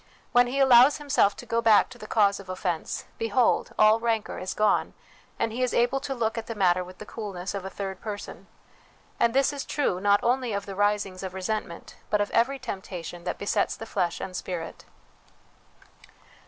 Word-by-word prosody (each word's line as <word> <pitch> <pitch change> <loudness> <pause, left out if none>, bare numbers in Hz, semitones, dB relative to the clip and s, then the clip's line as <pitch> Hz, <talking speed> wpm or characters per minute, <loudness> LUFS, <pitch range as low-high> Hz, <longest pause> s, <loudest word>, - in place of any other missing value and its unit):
When 245 0 +5
he 255 +3 -3
allows 265 +1 +7
himself 280 -9 +2
to - - -10
go 230 0 0
back 225 -2 +5
to 250 -2 -13
the 215 - -9
cause 200 -3 +3
of 195 -1 -12
offence, 185 -3 -3
behold, 225 +2 +2
all 215 +1 +5
rancour 225 -2 -1
is 185 - -4
gone, 210 -1 +1 0.4
and 225 - -1
he 240 +3 -4
is 255 - 0
able 245 +3 +2
to 270 0 -4
look 230 -1 -1
at 225 - -9
the 230 - -5
matter 185 -3 +2
with 180 +1 -12
the - - -9
coolness 195 -4 -6
of 195 -2 -5
a - - -4
third 195 -1 -6
person. 205 -2 -7 0.7
And 235 +1 +2
this 275 +1 +3
is 280 - -4
true, 235 -11 -1
not 205 +1 +4
only 245 -1 +1
of 200 0 -3
the 195 - -6
risings 205 -2 0
of 190 -1 -6
resentment, 190 -2 -4
but 210 - +2
of 205 - -1
every 260 +4 +2
temptation 185 -8 -7
that - - -2
besets 200 0 0
the 225 - -8
flesh 175 -5 -1
and 185 - -6
spirit. 175 -3 -6
210 Hz, 195 wpm, -26 LUFS, 190-235 Hz, 0.7 s, allows